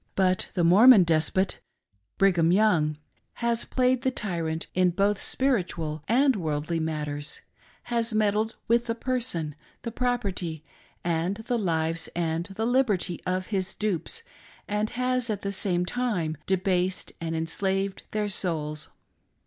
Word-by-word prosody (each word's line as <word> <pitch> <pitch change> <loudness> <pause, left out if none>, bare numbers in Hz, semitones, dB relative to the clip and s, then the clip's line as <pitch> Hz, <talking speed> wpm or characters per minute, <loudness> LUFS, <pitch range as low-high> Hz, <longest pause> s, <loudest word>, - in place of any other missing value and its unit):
But 185 -1 +1
the 175 - +2
Mormon 205 +5 +8
despot— 170 +3 +2 0.6
Brigham 175 -4 +4
Young 175 -7 +3 0.2
— - - -43
has 235 0 +1
played 255 -1 +1
the 260 - +1
tyrant 170 -8 -2
in 185 0 +3
both 200 +3 +1
spiritual 175 - 0
and 265 +4 +4
worldly 160 -2 -2
matters,— 150 -2 -4 0.5
^has 235 -1 +1
meddled 215 +1 +1
with 235 +1 +2
the 230 - -1
person, 235 - -2 0.3
the 230 - -4
property, 200 - -2 0.4
and 170 +3 0
the 235 +2 -2
lives 165 -3 0
and 165 -1 -1
the 205 +3 -3
liberty 225 -9 +1
of 185 0 -1
his 190 -1 -1
dupes; 215 - -2 0.4
and 210 +1 -1
has 250 -1 0
at 205 -2 -2
the 200 - -1
same 180 -2 0
time 190 -8 -1
debased 185 -1 0
and 165 0 -2
enslaved 190 +4 -1
their 210 -1 -1
souls. 155 -6 -2
190 Hz, 135 wpm, -26 LUFS, 165-225 Hz, 0.6 s, Mormon